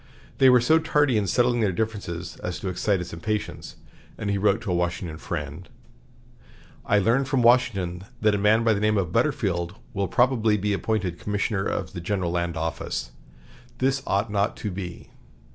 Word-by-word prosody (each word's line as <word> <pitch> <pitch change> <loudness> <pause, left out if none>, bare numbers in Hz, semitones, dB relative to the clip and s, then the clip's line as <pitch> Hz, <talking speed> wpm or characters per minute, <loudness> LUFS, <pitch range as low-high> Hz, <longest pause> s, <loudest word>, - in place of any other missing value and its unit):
They 130 - +7
were 125 -1 +6
so 160 +7 +4
tardy 145 -5 +2
in 105 -2 +1
settling 120 +5 +2
their 105 -4 +2
differences 90 -4 -4
as 90 0 -5
to 95 - -3
excite 95 +2 0
his 90 - -7
impatience, 105 +5 -4 0.4
and 100 -2 -2
he 100 - +1
wrote 100 +1 +3
to 110 -5 -3
a - - +1
Washington 85 -2 -2
friend: 75 +1 -5 1.1
"I 105 - +2
learn 115 +7 +3
from 135 -2 +1
Washington 100 -7 +2
that 105 -1 +3
a 105 - 0
man 110 +3 +4
by 115 -1 +4
the 100 - -1
name 105 0 +2
of 90 -4 -1
Butterfield 95 - 0 0.2
will 100 -1 -1
probably 115 -3 +2
be 105 +1 0
appointed 100 -5 -1
Commissioner 105 -1 -1
of - - -3
the 85 - -5
General 90 -1 -1
Land 85 -1 -1
Office, 80 -6 -3 0.7
This 135 +1 +1
ought 100 +3 0
not 100 0 0
to 105 - -4
be.... 90 -2 -7
100 Hz, 180 wpm, -25 LUFS, 90-115 Hz, 1.1 s, They